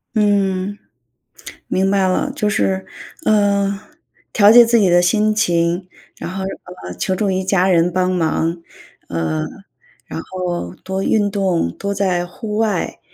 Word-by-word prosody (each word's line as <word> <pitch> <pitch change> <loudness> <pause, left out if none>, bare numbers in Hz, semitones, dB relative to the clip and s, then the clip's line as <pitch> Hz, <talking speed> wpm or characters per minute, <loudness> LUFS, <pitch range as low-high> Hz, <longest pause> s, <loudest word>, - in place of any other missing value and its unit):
嗯。 200 -2 +1 0.9
明 190 +1 +1
白 195 -1 +2
了， 185 - 0
就 210 - 0
是， 190 -1 0 0.4
呃， 200 -2 +2 0.5
调 205 -1 +6
节 240 +1 +9
自 235 +1 +3
己 195 -4 +3
的 175 0 +5
心 215 +4 +2
情， 175 -3 +1 0.3
然 - - -6
后， 190 +1 -4 0.4
呃， 90 - -6
求 190 - -1
助 195 0 0
于 190 0 -1
家 190 0 +2
人 175 0 +3
帮 185 0 +1
忙， 165 -1 0 0.5
呃， 80 -2 -2 0.6
然 - - -6
后 175 - -4
多 190 0 -3
运 205 -1 +2
动， 185 - 0
多 200 0 -3
在 185 -3 0
户 210 +4 -6
外， 215 -5 -1
190 Hz, 155 characters per minute, -18 LUFS, 175-205 Hz, 0.9 s, 节